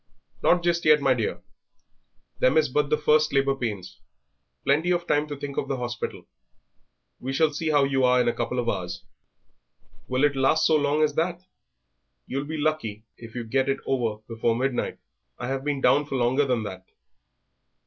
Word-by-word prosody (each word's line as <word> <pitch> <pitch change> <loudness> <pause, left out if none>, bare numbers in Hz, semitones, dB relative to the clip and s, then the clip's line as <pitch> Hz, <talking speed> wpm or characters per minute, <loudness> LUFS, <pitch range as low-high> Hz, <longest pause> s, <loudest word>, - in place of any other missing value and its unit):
"Not 175 0 +3
just 170 0 +1
yet, 155 -1 +6
my 135 -2 +3
dear; 115 -4 -3 1.0
them 130 - +3
is 155 -2 +3
but 145 +2 0
the 150 - +2
first 155 0 +3
labour 135 0 +2
pains; 105 -8 -5 0.7
plenty 155 +5 +2
of 175 -1 +1
time 150 -2 +1
to 145 - -5
think 140 0 -6
of - - -1
the 135 - -2
hospital; 120 -1 -5 0.9
we 130 - -4
shall 150 +2 +2
see 155 +2 -2
how 145 -2 +4
you 135 -1 +1
are 125 0 +4
in 120 - +2
a 120 - +2
couple 125 - -3
of 120 -1 -1
hours." 90 -5 -3 1.0
"Will 130 +2 0
it 145 -1 +3
last 135 +4 +3
so 160 - +4
long 150 +1 +2
as 150 -1 +2
that?" 170 +3 -1 0.8
"You'll 140 +2 -3
be 160 +2 -5
lucky 145 -9 -2
if 115 -1 -12
you 120 - -3
get 130 +4 0
it 135 - +1
over 115 -5 -1
before 115 0 0
midnight. 130 +1 -1 0.4
I 120 - -5
have 135 0 -2
been 145 -2 -2
down 135 +4 +4
for 135 - -4
longer 130 +3 +2
than 125 -4 0
that." 95 -3 -7
135 Hz, 190 wpm, -25 LUFS, 125-150 Hz, 1.0 s, yet